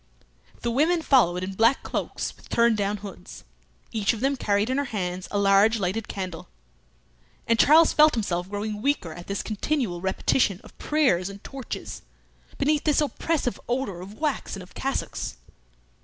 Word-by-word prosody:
The 235 Hz, -, -1 dB
women 320 Hz, +7 st, +2 dB
followed 185 Hz, -, +3 dB
in 190 Hz, +1 st, -4 dB
black 230 Hz, +7 st, +3 dB
cloaks -, -, -3 dB
with -, -, -19 dB
turned 235 Hz, -1 st, +3 dB
down 205 Hz, 0 st, -1 dB
hoods; 200 Hz, -, -10 dB, 0.5 s
each 215 Hz, -1 st, +1 dB
of 225 Hz, -, -6 dB
them 270 Hz, +3 st, +1 dB
carried 205 Hz, -4 st, +1 dB
in 265 Hz, -, +1 dB
her 285 Hz, -, 0 dB
hands 185 Hz, -6 st, -3 dB
a 205 Hz, -, -2 dB
large 200 Hz, +3 st, +4 dB
lighted 205 Hz, +2 st, -2 dB
candle, 185 Hz, -, -6 dB, 1.0 s
and 230 Hz, -1 st, +2 dB
Charles 320 Hz, +3 st, +6 dB
felt 305 Hz, -1 st, +6 dB
himself 180 Hz, -5 st, -2 dB
growing 210 Hz, +1 st, -4 dB
weaker 250 Hz, -, 0 dB
at 175 Hz, +2 st, -10 dB
this 200 Hz, 0 st, -3 dB
continual 215 Hz, -, -2 dB
repetition 190 Hz, +1 st, +1 dB
of -, -, -16 dB
prayers 255 Hz, -, +2 dB
and 200 Hz, 0 st, -11 dB
torches, 270 Hz, -4 st, -7 dB, 0.6 s
beneath 300 Hz, +1 st, +1 dB
this 300 Hz, -2 st, +3 dB
oppressive 300 Hz, -2 st, -1 dB
odour 240 Hz, -8 st, -2 dB
of 195 Hz, +3 st, -10 dB
wax 300 Hz, -5 st, -2 dB
and 195 Hz, -, -8 dB
of 180 Hz, -, -16 dB
cassocks. 270 Hz, -, -3 dB
215 Hz, 165 wpm, -25 LUFS, 195-275 Hz, 1.0 s, Charles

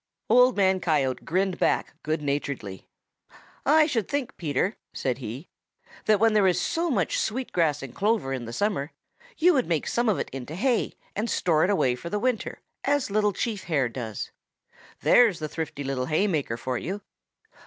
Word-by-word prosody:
Old 250 Hz, 0 st, +6 dB
Man 190 Hz, -1 st, +3 dB
Coyote 150 Hz, -7 st, 0 dB
grinned 185 Hz, +1 st, 0 dB
back -, -, +1 dB
good 155 Hz, 0 st, -2 dB
naturedly. 140 Hz, -9 st, -3 dB, 0.8 s
"I 310 Hz, +2 st, +6 dB
should 235 Hz, -, -1 dB
think, 285 Hz, -3 st, -2 dB
Peter," 160 Hz, -, -1 dB, 0.2 s
said 130 Hz, -1 st, -1 dB
he, 125 Hz, +6 st, -7 dB, 0.6 s
"that 215 Hz, -2 st, +4 dB
when 225 Hz, 0 st, +4 dB
there 205 Hz, -3 st, +4 dB
is 180 Hz, -, +2 dB
so 335 Hz, +1 st, 0 dB
much 265 Hz, -, +1 dB
sweet 250 Hz, +4 st, -2 dB
grass 150 Hz, -5 st, +1 dB
and 135 Hz, -, -8 dB
clover 205 Hz, -10 st, 0 dB
in 125 Hz, -3 st, -4 dB
the 115 Hz, -, -6 dB
summer, 175 Hz, -, -1 dB, 0.4 s
you 355 Hz, +3 st, +5 dB
would 260 Hz, -5 st, +1 dB
make 165 Hz, -3 st, 0 dB
some 240 Hz, -1 st, +1 dB
of 205 Hz, -, +2 dB
it -, -, -4 dB
into 135 Hz, +3 st, -6 dB
hay 240 Hz, +5 st, +1 dB, 0.2 s
and 220 Hz, +3 st, -1 dB
store 160 Hz, -6 st, +2 dB
it -, -, -1 dB
away 160 Hz, -11 st, +2 dB
for 125 Hz, +8 st, -7 dB
winter, 245 Hz, +1 st, -1 dB, 0.2 s
as 285 Hz, -5 st, +1 dB
Little 210 Hz, 0 st, +2 dB
Chief 210 Hz, 0 st, -3 dB
Hare 140 Hz, -7 st, +1 dB
does. 115 Hz, -3 st, -5 dB, 0.7 s
There's 230 Hz, -8 st, +5 dB
the 155 Hz, -, -4 dB
thrifty 155 Hz, -2 st, -5 dB
little 135 Hz, -2 st, -2 dB
hay 160 Hz, +6 st, +2 dB
maker 150 Hz, -, -1 dB
for 125 Hz, +1 st, -3 dB
you!" 200 Hz, +4 st, -5 dB
180 Hz, 180 wpm, -26 LUFS, 140-220 Hz, 0.8 s, Old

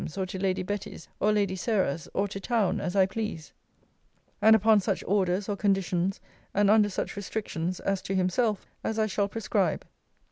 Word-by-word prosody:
's, 160 Hz, -, -7 dB
or 190 Hz, -, 0 dB
to 185 Hz, 0 st, -6 dB
Lady 185 Hz, -1 st, 0 dB
Betty's 205 Hz, -3 st, -5 dB
or 210 Hz, -, +3 dB
Lady 200 Hz, -3 st, +1 dB
Sarah's, 185 Hz, -, -1 dB
or 200 Hz, +1 st, +1 dB
to 195 Hz, -, -5 dB
town, 220 Hz, -2 st, +1 dB
as 180 Hz, +1 st, -3 dB
I 190 Hz, -1 st, +5 dB
please; 190 Hz, -5 st, -5 dB, 0.9 s
and 220 Hz, 0 st, +7 dB
upon 220 Hz, 0 st, +5 dB
such 190 Hz, -, -1 dB
orders, 190 Hz, 0 st, +1 dB
or 205 Hz, -, -1 dB
conditions, 195 Hz, -2 st, 0 dB, 0.4 s
and 205 Hz, 0 st, +4 dB
under 210 Hz, -1 st, +5 dB
such 190 Hz, -, -4 dB
restrictions, 185 Hz, -4 st, -3 dB
as 195 Hz, -1 st, -1 dB
to 195 Hz, 0 st, -3 dB
himself, 190 Hz, +3 st, +1 dB, 0.2 s
as 220 Hz, -, -2 dB
I 220 Hz, -, +3 dB
shall 205 Hz, -1 st, 0 dB
prescribe.' 225 Hz, +2 st, -1 dB
195 Hz, 180 wpm, -28 LUFS, 185-210 Hz, 0.9 s, and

